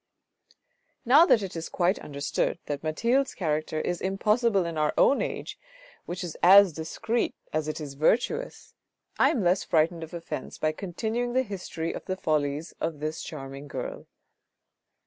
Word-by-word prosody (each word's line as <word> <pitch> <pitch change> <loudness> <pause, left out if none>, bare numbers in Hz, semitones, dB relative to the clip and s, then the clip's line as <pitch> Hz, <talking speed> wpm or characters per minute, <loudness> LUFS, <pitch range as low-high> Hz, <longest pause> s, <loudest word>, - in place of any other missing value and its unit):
Now 290 +8 +7
that 215 - +4
it 190 - -6
is 165 0 -5
quite 180 +2 +1
understood 140 +2 -2
that 145 -1 -4
Mathilde's 235 - +1
character 155 -2 -1
is 175 +2 -2
impossible 205 +1 +2
in 170 -1 -4
our 150 -1 0
own 280 - +4
age, - - -4 0.5
which 180 +2 -4
is 170 -3 -5
as 195 0 +8
discreet 220 +9 -2 0.2
as 155 -1 -1
it 155 - -3
is 145 -3 -6
virtuous, 245 - 0 0.5
I - - +6
am 225 - 0
less 180 +2 +2
frightened 165 0 +1
of 160 +2 -8
offence 170 - -6
by 155 - +1
continuing 220 +8 -3
the 260 +1 +3
history 180 -6 -5
of - - -7
the 185 -1 -3
follies 150 -2 -1
of 160 -2 -2
this 155 +1 -3
charming 135 -1 -8
girl. - - -6
175 Hz, 160 wpm, -27 LUFS, 155-215 Hz, 0.5 s, as